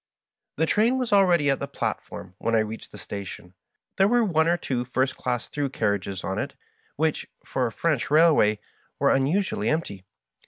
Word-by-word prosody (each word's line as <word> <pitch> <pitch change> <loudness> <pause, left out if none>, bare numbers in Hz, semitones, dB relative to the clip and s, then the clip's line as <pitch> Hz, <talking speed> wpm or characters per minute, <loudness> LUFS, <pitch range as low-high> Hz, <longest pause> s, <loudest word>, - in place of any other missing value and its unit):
The 160 - +1
train 225 +9 +2
was 250 -5 -1
already 180 -7 +4
at 135 - -1
the - - -4
platform 90 - -5
when 115 - 0
I 110 -1 +3
reached 110 +1 -8
the - - -11
station. 95 -3 -8 0.4
There 195 - +5
were 240 +2 +3
one 160 -4 +2
or 170 +1 +3
two 125 -6 -2
first 130 +1 -1
class 120 -2 -3
through 145 -2 -2
carriages 100 -6 -2
on 95 +3 -2
it, - - -4 0.4
which, 155 +1 -1 0.2
for 130 -2 -1
a - - -5
French 150 -3 -1
railway, 150 -9 +5 0.4
were - - +3
un 135 0 +2
usually 205 +5 0
empty. 100 - -3
140 Hz, 185 wpm, -25 LUFS, 110-170 Hz, 0.4 s, There